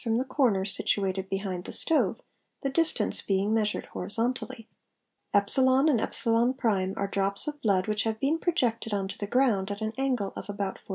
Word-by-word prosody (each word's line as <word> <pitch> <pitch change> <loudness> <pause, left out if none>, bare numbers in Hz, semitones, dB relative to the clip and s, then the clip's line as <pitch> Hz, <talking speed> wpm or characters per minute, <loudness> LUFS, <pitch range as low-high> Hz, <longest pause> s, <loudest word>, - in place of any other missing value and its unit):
from 225 -2 0
the 255 - -1
corner 250 -8 +1
situated 195 -1 -1
behind 190 -2 -3
the - - -6
stove, 325 - +1 0.4
the 275 - -1
distance 330 +3 +2
being 200 +2 0
measured 215 -2 0
horizont 230 +4 0
_ - - -17
ally. 260 - -7
e 220 - -23 0.6
and - - +4
€ 235 -5 +2
are 200 - -1
drops 200 +2 -1
of 295 -1 -5
blood 195 -4 +1
which 215 0 0
have 220 -1 -2
been 295 +6 +1
projected 235 - 0
on 195 -1 -2
to 195 - -7
the 205 - -2
ii - - -10
'i - - -21
ground, 230 -7 +2
at 205 0 -4
an 220 0 -3
angle 250 -7 -1
of - - -8
about 200 -1 -4
40°. - - -26
220 Hz, 205 wpm, -27 LUFS, 200-260 Hz, 0.6 s, and